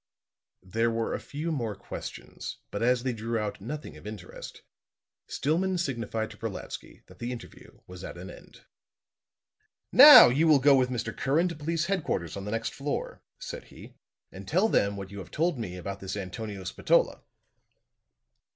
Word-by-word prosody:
There 115 +6 0
were 115 0 -1
a - - -2
few 155 +4 -5
more 115 -8 -2
questions, - - -8
but 100 - -4
as 125 +1 +2
they 130 -1 -1
drew 115 +1 -3
out 105 -2 -3
nothing 135 - -6
of 85 - -11
interest, 105 -4 -9 0.6
Stillman 180 +6 0
signified 115 -8 -2
to - - -13
Brolatsky 110 -4 -7
that 90 0 -18
the 120 +1 -3
interview 120 -2 -11
was 90 0 -11
at - - -7
an 90 +1 -8
end. - - -15 1.3
"Now, 290 - +11
you 150 +7 +2
will 155 -2 +7
go 140 +1 +5
with 130 -1 +2
Mr. 115 -2 -3
Curran 160 +7 +1
to 170 - -6
police 160 +2 -1
headquarters 160 - -2
on 100 0 -6
the - - -4
next 115 0 -2
floor," 140 +1 -4 0.2
said - - -7
he, - - -14 0.4
"and 95 +1 -10
tell 185 +8 +2
them 100 - +2
what 95 -1 -7
you 100 - -7
have 95 - -9
told 160 -3 0
me 90 -5 -5
about 100 +2 -6
this 95 +1 -5
Antonio 100 +1 -6
Spatola." 90 - +1
115 Hz, 170 wpm, -28 LUFS, 100-145 Hz, 1.3 s, Now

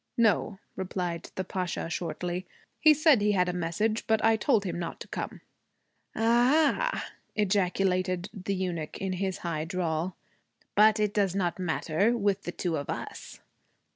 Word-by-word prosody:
'No,' 215 -3 +2 0.2
replied 180 -2 -3
the 190 - -2
Pasha 180 -2 -3
shortly. 175 +2 -3 0.3
'He 310 - +7
said 305 -5 +5
he 210 0 +3
had 180 -2 +3
had 180 - -1
a - - -2
message, 210 +7 -1
but 220 -1 +2
I 225 0 +5
told 220 -1 +2
him 175 -3 -3
not 170 - -5
to - - -7
come.' - - -5 0.7
'A - - -3
ah!' 295 - +3 0.3
ejaculated 185 -2 +1
the 195 -1 -3
eunuch 175 -5 -3
in 190 -1 -2
his 190 0 -2
high 160 -3 -1
drawl. 170 0 -2 0.6
'But 215 +1 +5
it 210 -1 +1
does 195 -3 +1
not 180 -2 -1
matter 175 +7 +1
with 200 -2 0
the 175 - -2
two 175 -2 -2
of 140 - -5
us.' - - -6
190 Hz, 165 wpm, -28 LUFS, 175-215 Hz, 0.7 s, He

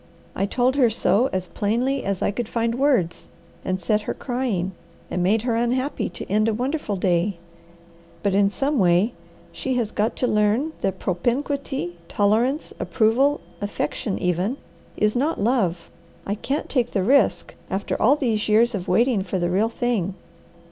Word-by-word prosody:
I 195 - 0
told 255 +5 +1
her 250 -4 +5
so 230 +2 +2
as 185 -1 -2
plainly 240 +6 0
as 195 -2 -2
I - - +2
could 235 +2 -4
find 230 0 0
words, 250 - +1 0.4
and 185 0 -1
set 210 +4 +1
her - - -4
crying, 240 -8 -2 0.4
and 180 - -1
made 210 +5 +2
her 240 -2 0
unhappy 250 +4 0
to - - -7
end 215 +3 +2
a 220 - +1
wonderful 255 -2 -2
day. 180 0 +1 0.9
But 200 -2 +1
in 200 0 +4
some 275 +6 0
way 185 +5 +3 0.4
she 260 -1 -3
has 230 -3 0
got 215 +2 0
to - - 0
learn 215 +8 +1
that 190 -1 -1
propinquity, 245 +1 -2
tolerance, 230 - +1
approval, 260 +6 +2 0.2
affection, 205 0 -2
even 180 +7 0 0.4
is 210 +1 +2
not 290 +6 0
love. 200 -7 0 0.3
I 200 - -1
can't 270 +7 -3
take 245 -4 0
the 195 - +1
risk, 275 +7 +2 0.2
after 190 +2 -2
all 265 +6 +5
these 225 -7 -1
years 230 +3 +4
of 190 -3 -4
waiting 230 +3 +3
for 190 0 -3
the 175 -1 0
real 205 +5 +2
thing. 225 -6 -1
220 Hz, 165 wpm, -23 LUFS, 195-250 Hz, 0.9 s, her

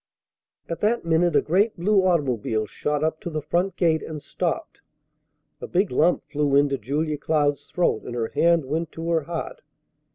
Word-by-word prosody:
At 165 - -4
that 220 -2 +1
minute 165 0 +2
a 145 - +4
great 200 +7 +1
blue 195 +3 +3
automobile 125 - 0
shot 150 +7 -2
up 160 0 -1
to - - -4
the 155 -2 -3
front 175 +5 -1
gate, 165 -3 +2
and 155 -1 -6
stopped. 165 +4 -4 0.8
A - - -5
big 190 +3 +1
lump 160 +8 +2
flew 145 -2 +1
into 140 -1 +3
Julia 150 +5 -2
Cloud's 145 -2 0
throat, 175 -10 0
and 120 - -6
her 115 -2 -2
hand 170 -3 +3
went 160 +4 -2
to 165 +1 -4
her 165 -1 +2
heart. 175 - -5
160 Hz, 175 wpm, -24 LUFS, 145-175 Hz, 0.8 s, a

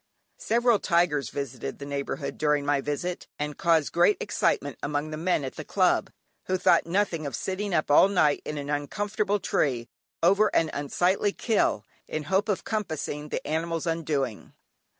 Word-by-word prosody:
Several 235 -1 +2
tigers 170 -8 +1
visited 135 -4 -5
the 140 - -8
neighbourhood 140 +1 -4
during 150 -1 +2
my 145 -1 +2
visit, 160 +6 -3
and 150 0 -3
caused 165 -5 +2
great 175 +4 +4
excitement 145 - -1
among 150 +1 -2
the - - -3
men 165 -1 0
at 130 - -6
the - - -5
Club, - - +2 0.4
who 185 - +1
thought 175 -2 +3
nothing 170 -4 0
of 140 - -4
sitting 195 +2 -3
up 155 -4 +1
all 150 - +7
night 155 -7 +2
in 150 - -5
an 145 0 -4
uncomfortable 205 +8 -1
tree, 125 -10 0 0.4
over 200 +5 +5
an 160 -1 +2
unsightly 180 +8 +1
"kill," 200 - +1 0.2
in 155 - -3
hope 195 +6 0
of 200 - 0
compassing 160 -8 -3
the - - -4
animal's 165 +1 -2
undoing. 150 -8 -2
160 Hz, 165 wpm, -27 LUFS, 145-185 Hz, 0.4 s, all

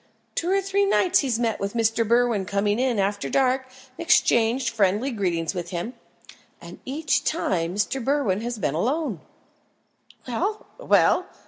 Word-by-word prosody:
Two 340 - -2
or 390 +1 +2
three 390 +1 +1
nights 380 -2 +3
he's 255 -5 0
met 230 -2 -1
Mr. 225 +2 0
Berwin 235 -4 +2
coming 205 +2 0
in 255 -3 +1
after 200 +1 -1
dark 260 0 +1
and 255 - -21 0.3
exchanged 235 -5 +3
friendly 215 +4 +1
greetings 175 -7 -1
with 175 -2 -5
him, 175 +7 -4 0.7
and - - -11
each 275 0 0
time 180 - -1
Mr. 220 +5 -1
Berwin 260 -8 0
has 240 0 -4
been 150 -9 -1
alone!" 245 - -1 1.1
"Well! 385 - -2
well! 375 -6 +3
235 Hz, 145 wpm, -24 LUFS, 200-275 Hz, 1.1 s, nights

